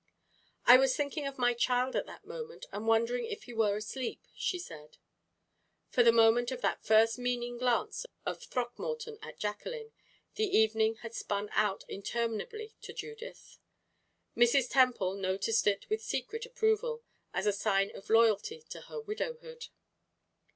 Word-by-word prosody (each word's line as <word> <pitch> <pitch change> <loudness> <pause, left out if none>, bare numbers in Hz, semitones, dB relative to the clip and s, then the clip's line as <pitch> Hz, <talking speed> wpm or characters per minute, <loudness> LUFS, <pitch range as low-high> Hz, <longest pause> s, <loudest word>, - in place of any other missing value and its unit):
"I 245 - +10
was 265 0 +3
thinking 290 0 -2
of 275 - -6
my 245 -1 +3
child 250 +2 +1
at - - 0
that - - -12
moment 470 0 -7
and 210 +3 -5
wondering 230 +2 +2
if 430 -1 -6
he 245 - -10
were 210 -3 +2
asleep," 230 +4 -5
she 360 - -1
said. 155 - -10 0.9
From 245 - +4
the 230 - +8
moment 230 +1 +5
of 255 -1 -4
that - - 0
first 225 +2 +4
meaning 245 -1 -2
glance 255 - 0 0.2
of - - -3
Throckmorton's 445 - -4
at 455 - -9
Jacqueline, 445 - -4 0.4
the 430 -3 +1
evening 220 0 +3
had 230 0 -7
spun 205 -2 -2
out 210 -2 +1
interminably 235 - -3
to - - -8
Judith. 450 +2 -9 0.8
Mrs. 240 +2 +4
Temple 250 -8 +3
noticed 195 +3 0
it 200 -1 +1
with 435 +1 -1
secret 455 +1 -3
approval, 465 0 0 0.3
as - - -2
a 205 - +3
sign 195 -1 +1
of 200 - -11
loyalty 230 - +3
to - - -7
her 465 - -7
widowhood. 475 +2 -5
245 Hz, 150 wpm, -32 LUFS, -, 0.9 s, I